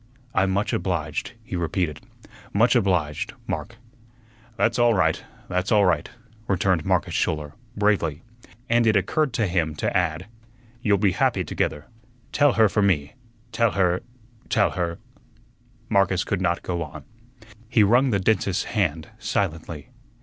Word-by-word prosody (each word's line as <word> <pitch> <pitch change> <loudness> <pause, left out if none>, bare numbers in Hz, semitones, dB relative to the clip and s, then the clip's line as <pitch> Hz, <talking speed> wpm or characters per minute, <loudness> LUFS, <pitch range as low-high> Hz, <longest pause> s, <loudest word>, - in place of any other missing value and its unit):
"I'm 95 0 +2
much 100 +2 0
obliged," 80 +1 -2
he 100 - -6
repeated; 85 -2 -2 0.5
"much 115 +5 +4
obliged, 90 - 0
Mark." - - -4 0.8
"That's 115 +1 +1
all 120 -1 +4
right, 80 -4 +1 0.2
that's 90 +2 -1
all 105 -2 +5
right," 85 -5 +1 0.4
returned 95 -3 +1
Marcus - - 0
Schouler, 75 -2 -1 0.2
bravely, 95 -7 +1 0.4
and 120 -2 +3
it 110 - +4
occurred 140 +9 +1
to 115 -3 +1
him 85 -4 0
to - - -2
add, 90 -1 0 0.6
"You'll 105 -3 +3
be 100 -1 +2
happy - - +1
together. 75 0 -2 0.5
Tell 145 -1 +4
her 110 -1 +5
for 105 +1 0
me 80 -8 +1 0.4
tell 115 -2 +2
her 90 -2 +2 0.5
tell - - +3
her 85 -2 -2 0.5
" 120 0 -34
Marcus 95 -3 +2
could 100 -3 -2
not 85 -2 0
go 85 -2 -2
on. 75 -3 -7 0.7
He 120 -3 +4
wrung 120 +6 +4
the 100 -4 +1
dentist's 100 -1 +1
hand 80 -8 0
silently. 80 -5 -3
95 Hz, 145 wpm, -24 LUFS, 85-110 Hz, 0.8 s, all